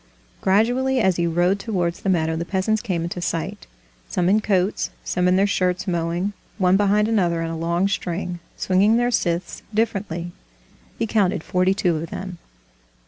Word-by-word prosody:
Gradually, 245 +7 +2
as 190 -6 +2
he 170 -1 +1
rode 175 +4 +2
towards 180 -5 -2
the - - -1
meadow, 160 -3 +1
the 165 - -2
peasants 200 +4 0
came 180 -7 -2
into 175 +1 -4
sight, 165 -2 -3 0.4
some 180 0 +1
in 210 +3 +4
coats, 195 -2 0
some 180 0 0
in 180 - +4
their 195 +1 +4
shirts 185 -2 0
mowing, 175 +3 -1 0.2
one 185 -2 +3
behind 205 +1 +3
another 175 -7 +1
in 165 - -3
a - - -4
long 170 +3 0
string, 180 -2 -3 0.2
swinging 200 +4 +3
their 245 +1 +1
scythes 170 -5 -1
differently. 195 -6 -1 0.7
He 230 - 0
counted 195 -6 +1
forty 185 +1 +1
two 175 -4 +1
of 160 +1 -5
them. 185 -2 -6
185 Hz, 170 wpm, -22 LUFS, 170-205 Hz, 0.7 s, in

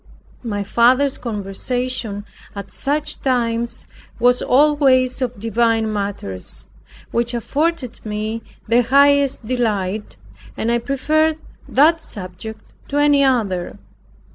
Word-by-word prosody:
My 205 -4 -3
father's 255 +6 +3
conversation 220 0 -3 0.3
at 200 - -7
such 295 +2 -2
times 235 -3 0 0.3
was 245 +1 +4
always 270 -2 +3
of 245 -4 -2
divine 225 0 +1
matters, 200 - -4 0.5
which 240 +1 0
afforded 285 +1 -2
me 215 +1 -3 0.3
the 235 +2 +4
highest 280 0 +3
delight, 215 -4 -2 0.4
and 230 - 0
I 235 - +2
preferred 310 +5 +1 0.3
that 320 +4 +4
subject 205 - -7
to 285 - -2
any 290 -1 +4
other. 210 -10 0
240 Hz, 105 wpm, -20 LUFS, 215-275 Hz, 0.5 s, was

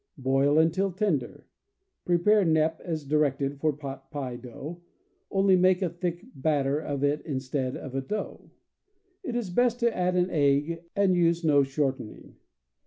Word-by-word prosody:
Boil 135 +2 +2
until 170 +5 +2
tender. 175 - -2 0.6
Prepare 195 +4 +3
knepp 160 -1 +2
as 160 -4 -4
directed 140 -1 0
for 155 +1 +2
pot 135 -2 -8
pie 135 -5 -5
dough, 135 +8 -9 0.5
only 195 -1 +3
make 185 +1 +3
a 175 - -1
thick 175 +2 -4
bat 145 0 0
ter 140 +2 0
of 145 -3 -4
it 145 +1 +1
instead 130 -2 -3
of 135 - -8
a 135 - -1
dough. 210 +11 -5 0.7
It 255 -10 -5
is 230 -7 -2
best 245 +4 +2
to 235 -1 +2
add 180 0 0
an 180 0 +1
egg 150 +3 +1
and 200 -2 +3
use 170 -1 +2
no 145 -3 +4
shortening. 135 -4 -3
155 Hz, 160 wpm, -27 LUFS, 140-180 Hz, 0.7 s, no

